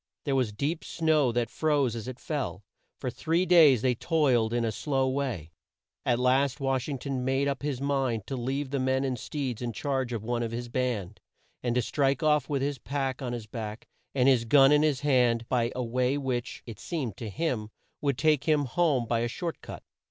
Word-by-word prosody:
There 140 - -1
was 125 -5 +1
deep 145 +10 -2
snow 155 -6 +2
that 120 0 -1
froze 145 -6 +1
as 115 0 -6
it 130 -1 -6
fell. 125 - -3 0.3
For 125 - -3
three 165 +8 0
days 155 -10 +6
they 130 -1 +3
toiled 125 -5 +2
on 120 - 0
in 120 - +1
a 110 - 0
slow 135 +3 0
way. 130 - -2 0.6
At 120 - +3
last 130 +3 +2
Wash 135 0 -1
ing 140 - -2
ton 130 -1 -3
made 135 +2 +1
up 140 -2 -2
his 140 -3 -2
mind 135 -6 0
to 135 - -4
leave 135 +3 -2
the 140 - 0
men 130 +1 +1
and 130 -3 -2
steeds 130 -5 -4
in 120 -1 -3
charge 130 +1 -2
of 115 -3 -3
one 120 +1 -1
of 115 - -1
his 120 +1 -5
band, 115 -6 -2 0.4
and 120 -1 -1
to 125 - +2
strike 135 +2 +1
off 150 -2 +2
with 140 -2 0
his 140 -2 -2
pack 135 +2 -3
on 125 -2 -3
his 120 -3 -5
back 110 0 -6 0.3
and 130 -1 +3
his 125 -4 +4
gun 135 +3 +6
in 150 0 +5
his 150 -4 +1
hand 125 -5 +2
by 120 -1 +1
a 125 - -1
way 125 +3 0
which, 130 -4 -3
it 115 -4 -9
seemed 135 - -3
to 115 - -5
him, 120 -5 -2 0.3
would 140 -4 0
take 155 -3 +2
him 150 -3 +3
home 140 -2 +1
by 115 0 0
a 120 - 0
short 165 +8 -5
cut. - - -9
130 Hz, 220 wpm, -28 LUFS, 120-140 Hz, 0.6 s, days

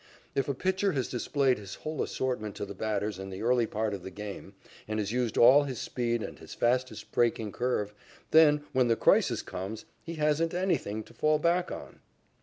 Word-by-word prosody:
If 135 - 0
a 140 - 0
pitcher 190 +5 +1
has 130 -3 -1
displayed 130 0 +1
his 100 -2 -8
whole 155 -1 -4
assortment 115 -6 -2
to - - -4
the 100 - -7
batters 105 -1 -2
in 95 0 -6
the 95 +2 -6
early 120 -1 +3
part 110 -1 -1
of 100 - -5
the 95 - -7
game 100 0 -8 0.3
and 110 0 -2
has 105 -1 -1
used 120 -2 -1
all 130 +5 +8
his 130 -4 -4
speed 120 -2 -1
and - - -7
his - - -10
fastest 125 +2 0
breaking 115 -3 +1
curve, 105 -4 -1 0.4
then, 150 -2 +6
when 130 -2 +3
the 115 - +3
crisis - - +3
comes, 100 +4 -6 0.2
he 170 - -7
"hasn't 155 +2 +1
anything" 160 - -1
to - - -17
fall 155 0 +2
back 170 +3 +1
on. - - -8
120 Hz, 200 wpm, -29 LUFS, 105-145 Hz, 0.4 s, all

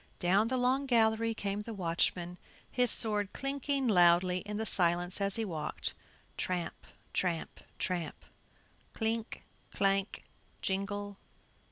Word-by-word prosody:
Down 195 +5 +3
the 260 +2 0
long 260 +3 +1
gallery 225 -2 +3
came 200 -1 -2
the 225 +1 -7
watchman, 175 0 -1 0.3
his 250 -1 +2
sword 210 -3 +3
clinking 275 0 -1
loudly 180 -2 +5
in 210 0 -3
the 220 - -2
silence 175 0 +3
as 200 0 +1
he 225 - -1
walked, 155 -6 -4 0.4
tramp, 180 -2 -3 0.3
tramp, 170 -3 -2 0.2
tramp! 180 -3 -3 0.7
clink, 225 0 -2 0.3
clank, 195 0 0 0.4
jingle. 205 +1 -2
200 Hz, 120 wpm, -32 LUFS, 180-225 Hz, 0.7 s, loudly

